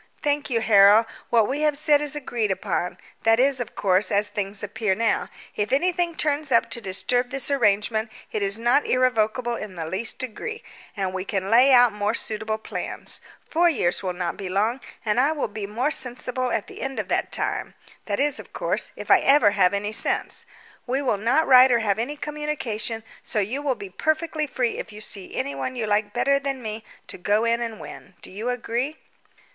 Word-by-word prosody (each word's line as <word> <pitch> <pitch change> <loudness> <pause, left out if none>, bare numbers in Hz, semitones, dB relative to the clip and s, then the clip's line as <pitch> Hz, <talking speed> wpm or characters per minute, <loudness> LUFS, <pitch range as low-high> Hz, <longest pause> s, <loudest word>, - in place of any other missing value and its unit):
"Thank 290 0 0
you, 230 -3 +1
Harold. 210 0 +6 0.2
What 225 -3 +4
we 275 +3 -2
have 300 -2 +2
said 300 -1 +3
is 295 0 -1
agreed 240 -7 -2
upon 185 -2 -2 0.2
that 225 +1 +4
is, 265 0 +4
of 245 - -5
course, 190 +1 +2
as 205 +1 +2
things 205 0 -4
appear 210 -1 -1
now: 225 +1 0 0.3
if 210 0 -1
anything 345 +3 +1
turns 300 -2 -1
up 230 - +3
to 235 - -3
disturb 245 +5 0
this 275 +2 -2
arrangement 220 -3 +1 0.2
it 215 - -2
is 200 +1 +1
not 240 +5 +2
irrevocable 240 -1 +1
in 210 -4 -7
the 165 -2 -4
least 190 +8 -2
degree, 285 - -5 0.3
and 190 -2 -2
we 185 0 -3
can 195 0 -3
lay 250 +4 +6
out 245 -3 +6
more 210 +2 -1
suitable 220 0 -3
plans. 220 - -6 0.3
Four 345 +2 +3
years 180 - 0
will 185 -2 -2
not 175 -1 -3
be 195 -2 -5
long, 215 +7 0 0.2
and 215 +2 +1
I 285 +5 +3
will 300 - -2
be 205 -1 -6
more 245 +8 -1
sensible 250 -1 -2
at 210 - -1
the - - -11
end 270 0 -3
of - - -3
that - - 0
time - - -2 0.3
that 205 -1 -1
is, 290 0 +2
of - - -12
course, - - -1
if - - -4
I - - +8
ever 270 -7 +5
have 195 -3 +3
any 205 +1 -2
sense. 220 - 0 0.4
We 265 +3 0
will 245 -6 +1
not 255 +9 +2
write 255 0 +7
or 240 - +5
have 215 -2 0
any 280 +6 -3
communication, 275 -8 -3 0.2
so 230 - -6
you 215 +8 -1
will 280 -3 0
be 200 -4 -9
perfectly 315 - -1
free 250 -3 -1
if - - -6
you 210 - -10
see 200 -3 -6
anyone 140 - -3
you 235 -3 -2
like 205 0 +1
better 275 +5 +2
than 275 -2 -4
me 215 0 -5 0.2
to - - -9
go 210 +5 +1
in 235 +1 +1
and 230 -2 -4
win. 190 - -11
Do - - -9
you 215 +6 -4
agree?" 250 +4 -2
230 Hz, 205 wpm, -24 LUFS, 205-270 Hz, 0.4 s, I